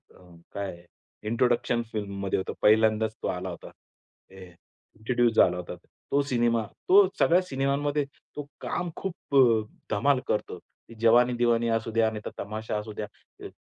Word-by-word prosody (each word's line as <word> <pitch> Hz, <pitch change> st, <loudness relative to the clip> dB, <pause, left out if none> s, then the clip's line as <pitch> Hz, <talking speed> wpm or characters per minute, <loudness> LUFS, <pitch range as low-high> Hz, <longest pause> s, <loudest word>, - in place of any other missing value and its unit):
अ, 90 Hz, -2 st, -18 dB, 0.2 s
काय 95 Hz, -4 st, -5 dB, 0.5 s
इंट्रोडक्शन 120 Hz, 0 st, +1 dB
फिल्ममध्ये 100 Hz, -2 st, -3 dB
होतं. 95 Hz, -, -4 dB
पहिल्यांदाच 110 Hz, 0 st, +3 dB
तो -, -, 0 dB
आला 90 Hz, +1 st, -3 dB
होता. 85 Hz, -, -9 dB, 0.6 s
हे 95 Hz, -1 st, -11 dB, 0.5 s
इंट्रोड्यूस 120 Hz, +1 st, +1 dB
झाला 90 Hz, -4 st, +4 dB
होता. 90 Hz, 0 st, -6 dB, 0.4 s
तो 140 Hz, -, +3 dB
सिनेमा 120 Hz, -4 st, +1 dB, 0.2 s
तो 195 Hz, +1 st, +7 dB
सगळ्या 175 Hz, +2 st, +4 dB
सिनेमांमध्ये 145 Hz, -1 st, -1 dB, 0.3 s
तो 145 Hz, -1 st, -6 dB
काम 175 Hz, -, -3 dB
खूप 175 Hz, -6 st, -6 dB
अ, 120 Hz, -5 st, +5 dB, 0.3 s
धमाल 130 Hz, +6 st, +2 dB
करतो. 105 Hz, -, -2 dB, 0.4 s
जवानी 120 Hz, +2 st, +5 dB
दिवानी 120 Hz, -1 st, +2 dB
असू 115 Hz, 0 st, -1 dB
द्या, 110 Hz, 0 st, +2 dB
नाहीतर 105 Hz, -1 st, -6 dB
तमाशा 110 Hz, +1 st, -4 dB
असू 105 Hz, +1 st, -6 dB
द्या. 105 Hz, -, -4 dB, 0.4 s
अ, -, -, -6 dB
115 Hz, 145 wpm, -27 LUFS, 105-130 Hz, 0.6 s, तो